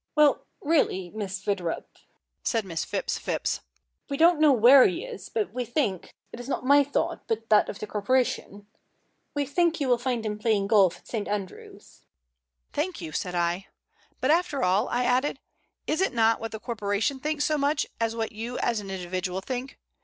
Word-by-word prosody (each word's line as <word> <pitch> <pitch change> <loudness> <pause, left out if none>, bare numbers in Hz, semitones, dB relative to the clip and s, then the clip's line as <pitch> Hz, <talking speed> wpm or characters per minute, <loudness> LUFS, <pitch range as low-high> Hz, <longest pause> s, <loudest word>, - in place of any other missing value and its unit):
"Well, 300 -2 +4
really, 190 - +1
Miss 200 -2 -5
Witherup," 185 -5 -2 0.6
said 225 -3 0
Miss 170 -3 -3
Phipps - - -2
Phipps, - - -2 0.5
"we 280 - -2
don't 335 0 +5
know 305 -2 +6
where 255 +2 +8
he 180 - -3
is, 195 - -9
but 215 -2 -2
we 250 0 -2
think 235 - -2 0.2
it 235 - -9
is 245 +2 -8
not 255 - -2
my 285 +2 +6
thought, 325 +4 -2
but 225 0 -2
that 210 - +5
of - - -5
the - - -5
corporation 210 -1 -1 0.7
we 290 -1 0
think 335 +4 +1
you 280 - 0
will 245 -1 +3
find 245 -2 -2
him 210 0 -3
playing 215 -3 +1
golf 200 -4 +4
at - - -23
St. 215 -4 -3
Andrews." 200 -3 -7 0.7
"Thank 335 +4 -2
you," 165 -4 -6
said 180 +3 -3
I. 175 +2 0 0.5
"But, 260 - +2
after 330 -4 +1
all," 190 +6 +2
I 245 +1 0
added, 255 +3 +1 0.5
"it 315 - 0
is 385 - +3
not 225 -1 +2
what 225 0 -5
the 220 - -6
corporation 220 +3 -1
thinks 300 +1 -1
so 310 - +1
much 285 +2 +1
as 230 0 0
what 225 -1 -2
you 230 +3 -5
as 235 -2 0
an 200 -2 -8
individual 185 0 -3
think. 255 +5 -5
230 Hz, 190 wpm, -26 LUFS, 200-275 Hz, 0.7 s, where